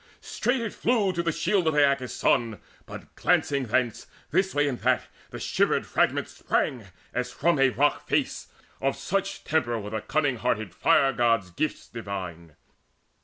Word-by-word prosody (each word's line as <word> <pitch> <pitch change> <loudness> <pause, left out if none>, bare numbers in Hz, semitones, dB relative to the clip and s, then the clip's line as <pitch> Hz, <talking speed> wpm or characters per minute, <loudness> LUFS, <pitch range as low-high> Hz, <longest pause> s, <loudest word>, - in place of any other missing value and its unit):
Straight 250 0 -1
it 225 -3 -3
flew 220 -6 +1
To 170 - -1
the 170 -1 0
shield 170 +2 +1
of 160 - +2
Aeacus' 140 -3 +2
son, 115 -5 +1 0.3
but - - -10
glancing 140 -2 +1
thence 120 0 0 0.2
This 190 +3 +1
way 145 0 +3
and 130 -4 -2
that - - +2 0.3
the - - -8
shivered - - +1
fragments - - 0
sprang 120 -5 -1 0.3
As 125 +1 -2
from 165 +4 +1
a 135 0 +5
rock 135 +5 +1
face: - - -1 0.3
of 135 0 +1
such 195 +1 -2
temper 125 -7 0
were 105 -1 -6
The 110 -1 -2
cunning 145 +2 0
hearted 110 -5 -1
Fire 135 +8 +3
god's 115 -7 +1
gifts 150 - -3
divine. 90 -8 -7
135 Hz, 165 wpm, -26 LUFS, 115-160 Hz, 0.3 s, a